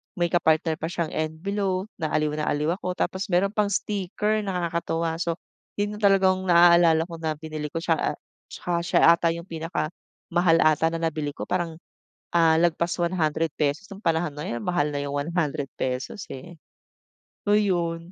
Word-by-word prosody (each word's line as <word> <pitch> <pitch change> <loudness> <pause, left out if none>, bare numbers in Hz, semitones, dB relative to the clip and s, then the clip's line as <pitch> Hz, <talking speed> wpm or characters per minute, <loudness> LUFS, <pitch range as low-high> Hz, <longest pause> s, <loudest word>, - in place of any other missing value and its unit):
may 175 -2 +1
ka-partner 160 -1 +2
pa - - -3
siyang 170 -2 -2
envelope 185 +5 -2
na 155 -2 -2
aliw 155 0 +2
na 150 - -1
aliw 150 +2 0
ako. 180 0 -3
Tapos 185 +1 -2
mayro'n 190 +1 +2
pang 210 -1 +1
sticker 210 +1 -1
nakakatuwa. 170 -2 -1
So 170 -1 -1 0.4
yun 205 +1 -2
talaga 195 -2 +5
ang 185 0 -3
naalala 170 -2 +6
ko 170 -1 -9
na 160 -1 -2
binili 155 -1 -5
ko 165 +3 -5
siya, 165 -3 +1
ah, - - -33 0.3
tsaka 175 - -5
siya 170 - +2
ata 170 0 +2
yung 170 - -7
pinakamahal 165 +1 -1
ata 155 +1 +4
na 165 0 -3
nabili 155 -3 -2
ko - - -5
parang, 175 -3 -2 0.6
ah, 165 -2 +4
lagpas 170 +1 +1
₱100 160 -2 0
nung 195 - -8
panahon 165 -4 0
na 150 +1 -6
yun, 120 0 -4
mahal 175 -5 +1
na 145 - -2
yung 140 - -4
₱100 145 -1 -2
eh. 165 +6 -9 0.9
So 205 - +2
yun. 175 -5 0
170 Hz, 165 wpm, -25 LUFS, 155-180 Hz, 0.9 s, naalala